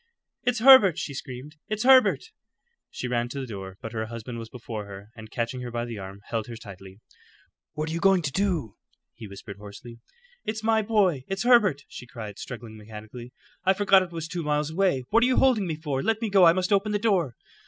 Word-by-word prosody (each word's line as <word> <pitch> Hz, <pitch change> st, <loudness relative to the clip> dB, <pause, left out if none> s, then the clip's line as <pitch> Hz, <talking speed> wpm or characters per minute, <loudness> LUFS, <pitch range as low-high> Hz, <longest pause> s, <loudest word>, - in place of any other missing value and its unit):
"It's 245 Hz, -1 st, 0 dB
Herbert!" 230 Hz, -, +8 dB
she 160 Hz, -4 st, -4 dB
screamed. 135 Hz, +3 st, -8 dB
"It's 215 Hz, +1 st, -2 dB
Herbert!" 260 Hz, 0 st, +5 dB, 0.6 s
She 125 Hz, -, -5 dB
ran 120 Hz, -1 st, -1 dB
to 140 Hz, -, -5 dB
the 135 Hz, -, -4 dB
door, 95 Hz, -5 st, -8 dB
but 115 Hz, -, -5 dB
her 110 Hz, -1 st, -3 dB
husband 115 Hz, +1 st, -7 dB
was 115 Hz, -1 st, -8 dB
before 115 Hz, -3 st, -7 dB
her, 100 Hz, +2 st, -11 dB
and 110 Hz, -1 st, -11 dB
catching 120 Hz, +3 st, -3 dB
her 125 Hz, -, -5 dB
by 120 Hz, 0 st, -3 dB
the 115 Hz, -3 st, -7 dB
arm, 95 Hz, +1 st, -9 dB
held 115 Hz, -2 st, -2 dB
her 120 Hz, -, -7 dB
tightly. 100 Hz, -3 st, -12 dB, 0.7 s
"What 155 Hz, 0 st, -3 dB
are -, -, -4 dB
you 170 Hz, -, -2 dB
going 190 Hz, -1 st, +3 dB
to 140 Hz, -, -2 dB
do?" 165 Hz, -, -1 dB, 0.4 s
he 110 Hz, -, -10 dB
whispered 100 Hz, +1 st, -10 dB
hoarsely. 105 Hz, +3 st, -11 dB, 0.4 s
"It's 220 Hz, 0 st, -4 dB
my 220 Hz, 0 st, +3 dB
boy; 200 Hz, -, +1 dB
it's 195 Hz, 0 st, -3 dB
Herbert!" 215 Hz, -, +4 dB
she 125 Hz, -, -10 dB
cried, 110 Hz, -5 st, -8 dB
struggling 115 Hz, -3 st, -8 dB
mechanically. 110 Hz, +3 st, -10 dB, 0.3 s
"I 190 Hz, +1 st, +4 dB
forgot 195 Hz, -1 st, +5 dB
it 185 Hz, -2 st, -5 dB
was 165 Hz, -1 st, -5 dB
two 170 Hz, +1 st, -4 dB
miles 150 Hz, 0 st, -1 dB
away. 170 Hz, -7 st, +1 dB
What 230 Hz, +2 st, +5 dB
are 245 Hz, -, +4 dB
you 255 Hz, -, +1 dB
holding 235 Hz, -8 st, +3 dB
me 160 Hz, -, -2 dB
for? 145 Hz, -4 st, -3 dB
Let 225 Hz, +5 st, +1 dB
go. 195 Hz, -2 st, +6 dB
I 165 Hz, -, +7 dB
must 185 Hz, +2 st, 0 dB
open 205 Hz, +1 st, +1 dB
the -, -, +2 dB
door." 190 Hz, -, +1 dB
140 Hz, 215 wpm, -26 LUFS, -, 0.7 s, Herbert